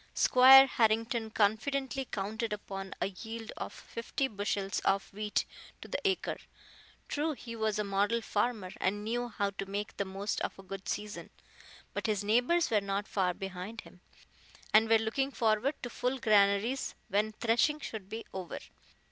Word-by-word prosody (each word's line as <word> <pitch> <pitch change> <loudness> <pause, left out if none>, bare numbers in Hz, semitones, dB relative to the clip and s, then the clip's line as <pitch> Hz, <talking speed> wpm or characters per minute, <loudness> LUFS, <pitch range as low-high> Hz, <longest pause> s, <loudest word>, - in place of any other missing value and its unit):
Squire 265 +1 +9
Harrington 225 -1 +1
confidently 265 +6 0
counted 220 +1 -3
upon 195 -2 -6
a - - 0
yield 225 +3 -7
of - - -5
fifty 250 +4 -3
bushels 200 -3 -2
of 195 0 0
wheat 210 +1 -1 0.3
to - - -10
the - - -2
acre. 385 -2 0 0.7
True, 305 +2 -1
he 235 -4 -8
was 220 -2 0
a 210 - 0
model 205 +3 +1
farmer, 215 -3 -1
and 205 +2 -1
knew 240 +3 -1
how 200 -2 -1
to 195 0 -6
make 205 +1 -4
the 200 - -1
most 195 +2 -3
of - - -3
a 195 - -11
good 195 0 -7
season, 210 0 -4 0.6
but - - -2
his 210 -2 0
neighbors 245 +11 +2
were 210 -2 +4
not 200 +1 -2
far 180 -3 0
behind 195 +3 -6
him, 180 - -17 0.7
and 220 +1 +6
were 225 - +7
looking 225 +5 0
forward 230 +3 +1
to 245 - -3
full 250 +3 -1
granaries 215 +3 +2
when 210 +2 +1
threshing 235 +7 +2
should 215 -8 -7
be 225 +1 -6
over. 185 -2 -5
215 Hz, 165 wpm, -31 LUFS, 200-235 Hz, 0.7 s, Squire